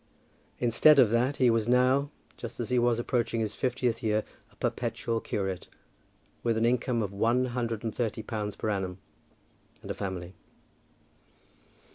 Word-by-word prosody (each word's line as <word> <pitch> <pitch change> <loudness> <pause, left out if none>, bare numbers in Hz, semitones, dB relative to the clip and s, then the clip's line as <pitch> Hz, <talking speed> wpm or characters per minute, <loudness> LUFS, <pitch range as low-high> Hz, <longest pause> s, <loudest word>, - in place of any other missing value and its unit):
Instead 125 +5 +5
of 120 -6 +6
that 125 +4 +1
he 125 -2 +4
was 115 -1 +1
now, 130 +3 +3 0.3
just 120 0 -8
as 120 - -3
he 125 -1 +3
was 120 -1 +3
approaching 120 -1 0
his 110 -2 -1
fiftieth 125 -3 -1
year, 110 -1 +1 0.3
a - - -24
perpetual 115 -1 -2
curate, 95 -3 -3 0.7
with 115 -1 +1
an 115 - +2
income 120 -1 +1
of 100 -1 -4
one 115 +5 +2
hundred 120 -3 -3
and 110 -2 -2
thirty 110 -2 -2
pounds 105 -2 -4
per 110 - -2
annum, 95 -2 -2 0.9
and - - -5
a - - -1
family. 95 -2 -5
115 Hz, 155 wpm, -29 LUFS, 105-125 Hz, 0.9 s, of